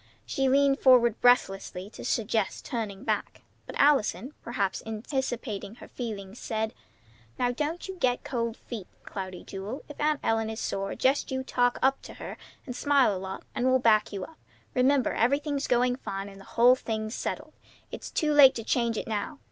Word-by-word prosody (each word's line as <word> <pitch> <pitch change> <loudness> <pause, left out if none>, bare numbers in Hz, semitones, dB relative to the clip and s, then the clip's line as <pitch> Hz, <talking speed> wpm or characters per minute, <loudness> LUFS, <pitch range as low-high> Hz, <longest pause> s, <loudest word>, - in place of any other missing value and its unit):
She 270 -1 0
leaned 275 +1 +4
forward 240 -4 +5
breathlessly 195 -6 +2
to - - -10
suggest 220 -4 -1
turning 215 -7 -4
back; - - -2 0.2
but - - -7
Allison, 275 -1 +3
perhaps 210 -5 -2
anticipating 225 -2 -4
her - - -12
feeling, 205 -6 -6
said: 220 -1 -3 0.6
"Now 245 0 +1
don't 305 +8 -3
you 380 -1 -7
get 255 -6 +1
cold 235 -2 -2
feet, 220 -7 -7 0.2
Cloudy 185 -2 -6
Jewel. 200 +7 -6
If 295 - -9
Aunt 300 -1 +2
Ellen 225 0 +1
is 220 0 -5
sore, 195 -2 -2
just 270 +2 +2
you 260 -1 -2
talk 245 -2 +1
up 270 +1 +3
to - - -11
her, - - -7 0.3
and 250 - -6
smile 275 -6 +3
a - - -4
lot, 190 0 -6
and 250 - 0
we'll 260 0 +5
back 220 -4 +3
you 200 -2 -4
up. 320 - -11 0.3
Remember 265 +1 +3
everything's, 280 +4 +1
going 245 0 +3
fine, 195 -5 -5
and 195 0 -13
the - - -14
whole 245 +2 +8
thing's 220 -3 -3
settled. - - -4 0.4
It's - - -7
too 305 -1 +1
late 275 -3 +8
to 225 - -4
change 235 -1 +1
it - - -4
now. 220 +7 -3
240 Hz, 180 wpm, -28 LUFS, 215-265 Hz, 0.6 s, whole